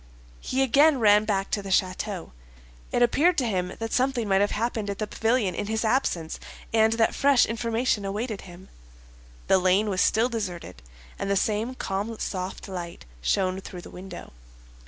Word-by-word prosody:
He 265 +1 0
again 280 +4 +5
ran 210 -1 +5
back 195 -2 -1
to 205 - 0
the 195 - -8
château. 185 0 -1 0.6
It 245 - +3
appeared 325 +9 +3
to 260 - +2
him 185 -4 -1
that 225 0 -4
something 255 -3 +1
might 195 0 +3
have 205 - +2
happened 220 -2 -2
at 200 - -3
the 215 - -2
pavilion 225 -2 0
in 205 - -3
his 220 +1 -1
absence, 200 -9 0 0.3
and 220 0 +4
that 225 0 +2
fresh 280 -2 +4
information 230 -1 -1
awaited 210 +2 -3
him. 180 0 -13 0.8
The 190 - +4
lane 190 +3 +2
was 185 - 0
still 225 +3 +3
deserted, 180 - -5 0.4
and 195 - -2
the 200 - +2
same 220 +5 0
calm 205 +1 -3
soft 185 -2 -4
light 175 - -7 0.2
shone 185 - 0
through 180 -2 -9
the - - -12
window. 185 - -9
210 Hz, 175 wpm, -26 LUFS, 190-230 Hz, 0.8 s, again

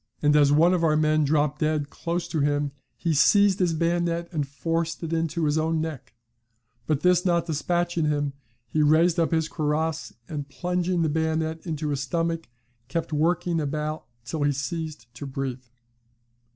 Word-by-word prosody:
and 150 0 +4
as 145 -1 +5
one 165 +5 +5
of 175 -2 +1
our 155 -2 +3
men 155 0 +3
dropped 150 0 +1
dead 155 -2 0
close 170 +1 -3
to 160 - -2
him, 145 0 +1 0.3
he 165 -2 0
seized 200 +6 +5
his 180 -3 +2
bayonet, 170 +1 0
and 150 -5 -2
forced 165 +4 -2
it 165 0 -3
into 165 0 0
his 150 +1 +2
own 160 +1 0
neck; 155 -7 -5 0.7
but 155 -2 +1
this 180 -1 +4
not 170 -2 +2
despatching 175 +1 0
him, 145 -2 0 0.3
he 155 +6 0
raised 160 +3 +4
up 165 - +2
his 160 -2 +1
cuirass, 155 0 -1 0.2
and 145 -3 -5
plunging 180 +2 -1
the - - +2
bayonet 160 +1 -1
into 155 -2 -2
his 140 -2 -1
stomach, 165 +2 -2 0.4
kept 160 +3 -3
working 170 +2 +1
it - - -1
about 150 +2 -3 0.2
till 155 +5 -4
he 145 0 +3
ceased 145 -1 -4
to 130 +4 -7
breathe. 130 -2 -4
160 Hz, 175 wpm, -25 LUFS, 145-170 Hz, 0.7 s, as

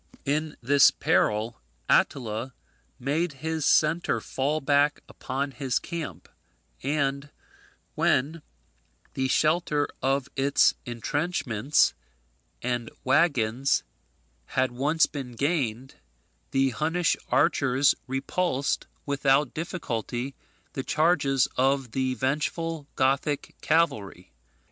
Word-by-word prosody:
In 150 +2 -1
this 140 +3 +6
peril 110 - 0 0.3
Attila 120 -1 +1 0.4
made 150 +5 -1
his 160 -2 0
centre 160 +3 +3
fall 145 +4 -1
back 145 0 +2
upon 140 +2 -4
his 135 -1 -1
camp; 155 - -6 0.5
and 140 0 -1 0.6
when 150 +5 +1 0.7
the 130 0 0
shelter 155 +1 +2
of 135 0 +1
its 140 +1 +4
entrenchments 130 - 0 0.7
and 120 -1 -2
waggons 135 -5 +2 0.6
had 130 -1 0
once 145 +6 +2
been 135 -4 -7
gained, 135 -3 -1 0.6
the 135 -1 +2
Hunnish 160 +7 +1
archers 135 0 +3
repulsed, 135 +2 -1 0.2
without 140 -1 +2
difficulty, 135 - -4 0.4
the 135 - -3
charges 145 -5 +2
of 135 -1 +1
the 130 +1 -1
vengeful 150 +3 -2
Gothic 140 +2 0
cavalry. 135 - 0
140 Hz, 90 wpm, -26 LUFS, 130-150 Hz, 0.7 s, this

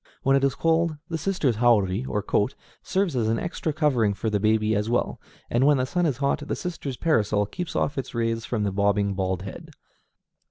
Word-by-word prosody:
When 135 0 +4
it 135 - +2
is 140 -1 +2
cold, 165 -1 +1
the 165 - -2
sister's 155 - 0
haori, 110 -2 +3
or 105 -5 -2
coat, 105 +7 0 0.3
serves 190 -5 0
as 115 -3 +1
an 115 +1 +1
extra 165 0 -3
covering 130 -10 +1
for 110 +2 -2
the 105 - +1
baby 110 +1 +2
as 105 +2 -1
well; 120 - -1 0.3
and 120 +2 +1
when 145 -1 +5
the 130 - +1
sun 175 +5 0
is 135 -6 -1
hot, 140 +1 +1
the - - -1
sister's 155 -7 -5
parasol 105 -10 +2
keeps 180 - -6
off 140 0 0
its 130 - -6
rays 115 -1 0
from 115 -3 -2
the 100 - 0
bobbing 100 0 +1
bald 95 -1 -2
head. 100 - -9
120 Hz, 210 wpm, -25 LUFS, 105-150 Hz, 0.3 s, when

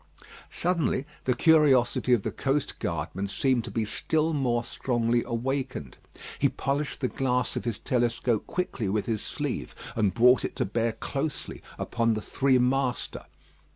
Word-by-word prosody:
Suddenly, 170 -6 0 0.2
the 125 - +2
curiosity 135 -5 +4
of 120 -5 +4
the - - -2
coast 140 +1 -1
guardman 85 +4 -3
seemed 125 +4 +1
to - - -6
be 115 -2 -1
still 160 +8 0
more 120 -5 +1
strongly 120 -1 0
awakened. 130 - -3 0.4
He - - +4
polished 140 +1 -2
the 130 - +2
glass 125 -2 0
of - - -3
his 115 -4 -1
telescope 120 -2 0
quickly 135 - -2
with 105 +1 0
his 110 -3 -1
sleeve, - - -4 0.2
and 105 -4 +2
brought 125 +6 +5
it - - -3
to - - 0
bear 115 +3 0
closely 140 +5 -4 0.2
upon 115 -2 0
the 110 - -3
three 135 +3 +2
master. 125 0 0
125 Hz, 155 wpm, -27 LUFS, 115-135 Hz, 0.4 s, brought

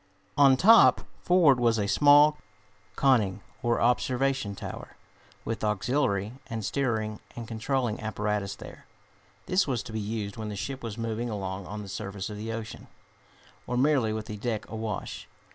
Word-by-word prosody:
On 135 -2 +6
top, 225 - +7 0.2
forward, 165 -8 +4
was 115 -2 +3
a 105 - 0
small 145 +5 +5 0.6
conning, 110 -8 +2 0.2
or 120 -1 +1
observation 125 -2 +1
tower, - - -8 0.5
with 115 -1 -4
auxiliary 105 0 0
and 115 -3 -4
steering 110 -3 -1 0.2
and 115 -1 -7
controlling 120 0 -1
apparatus 105 -3 -2
there. - - -12 0.6
This 185 -1 +2
was 125 -6 -1
to 110 - -9
be 110 - -2
used 105 -1 -4
when 110 -1 -5
the 105 - -5
ship 135 +6 -5
was 115 -2 -6
moving 115 +1 -3
along 95 -3 -4
on 105 +1 -6
the - - -9
surface 100 0 -5
of 105 - -7
the 110 +2 -5
ocean, 115 -1 -7 0.8
or 125 - -1
merely 130 -4 +3
with 110 0 -4
the 105 -2 -6
deck 110 0 -3
awash. 110 -2 -5
115 Hz, 160 wpm, -27 LUFS, 105-130 Hz, 0.8 s, top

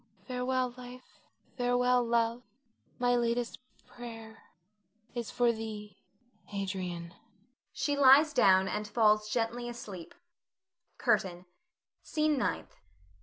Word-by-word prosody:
Farewell 255 0 -1
life, 250 0 -12 0.4
farewell 245 0 +2
love; 235 0 +1 0.6
my 245 0 +2
latest 235 0 -1 0.3
prayer 225 -2 -10 0.7
is 235 -2 -4
for 240 -1 +2
thee, 215 -2 -7 0.5
Adrian. 185 -4 -4 0.6
[She 290 - -1
lies 285 +2 +7
down 190 -7 +5
and 210 +1 -3
falls 215 -1 +3
gently 240 +1 -1
asleep.] 205 -8 -9 0.8
CURTAIN. 180 -1 0 0.6
SCENE 305 -1 +1
NINTH. - - -2
235 Hz, 95 wpm, -31 LUFS, 210-250 Hz, 0.8 s, lies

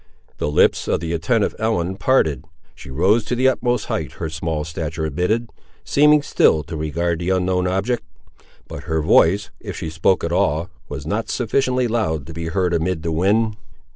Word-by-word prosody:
The - - -1
lips 75 - +3
of - - +1
the 85 0 -3
attentive 100 +7 +1
Ellen 95 -5 0
parted; 90 - +1 0.3
she - - -13
rose 95 - +2
to 125 - -1
the 130 +2 +3
utmost 125 -3 +1
height - - -3
her 80 -2 -5
small 80 -1 -2
stature 80 0 -4
admitted, 90 +10 -1 0.3
seeming 150 +1 +4
still 75 - +3
to 80 - -7
regard 80 +2 -1
the 90 +1 -2
unknown 90 -1 +1
object; 100 +7 0 0.7
but - - -8
her 80 0 -1
voice, 95 +6 +3
if - - -7
she 80 - -5
spoke 80 +4 +1
at 85 - -2
all, 85 0 0 0.2
was 75 -1 -6
not 105 +8 -2
sufficiently 125 +1 0
loud 95 -11 -1
to 80 - -9
be 85 +1 -5
heard 90 +1 0
amid 85 0 -1
the 85 - -1
wind. 105 +6 +1
90 Hz, 180 wpm, -21 LUFS, 80-110 Hz, 0.7 s, seeming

